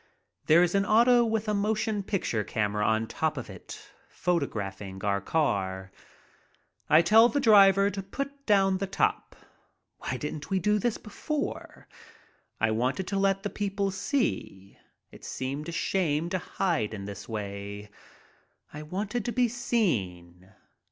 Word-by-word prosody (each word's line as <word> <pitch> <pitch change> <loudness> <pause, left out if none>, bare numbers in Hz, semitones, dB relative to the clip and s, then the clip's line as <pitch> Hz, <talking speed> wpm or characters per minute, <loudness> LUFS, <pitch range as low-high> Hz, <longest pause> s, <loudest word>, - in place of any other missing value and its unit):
There 165 +3 +6
is 175 - 0
an 200 0 +3
auto 240 +4 +5
with 225 -1 -1
a 210 - +1
motion 210 +1 0
picture 185 - -1
camera 105 0 -1
on 110 +1 +1
top - - -2
of - - -6
it - - -10 0.3
photographing 100 - -3
our 100 -1 0
car. 95 -9 -1 1.0
I 155 +2 +6
tell 225 +6 +6
the 285 - 0
driver 200 -5 +6
to 195 - -4
put 275 +8 -6
down 195 -3 +3
the 195 - -2
top. 195 - -1 0.6
Why 130 - -3
didn't 150 +2 -6
we 195 - +1
do 210 +3 +2
this 235 0 0
before? 290 +8 -5 0.7
I 110 0 +2
wanted 125 +11 -1
to 195 - -1
let 195 0 +1
the 205 - -3
people 200 -1 -2
see. 190 - -2 0.4
It - - -15
seemed 140 +4 -4
a - - -4
shame 165 -2 0
to 185 - 0
hide 165 - -1
in 100 -1 -7
this 100 +2 -8
way. 100 -1 -6 0.8
I 150 - -7
wanted 200 +8 -3
to 240 - -1
be 250 0 +2
seen. 95 - -2
180 Hz, 150 wpm, -28 LUFS, -, 1.0 s, There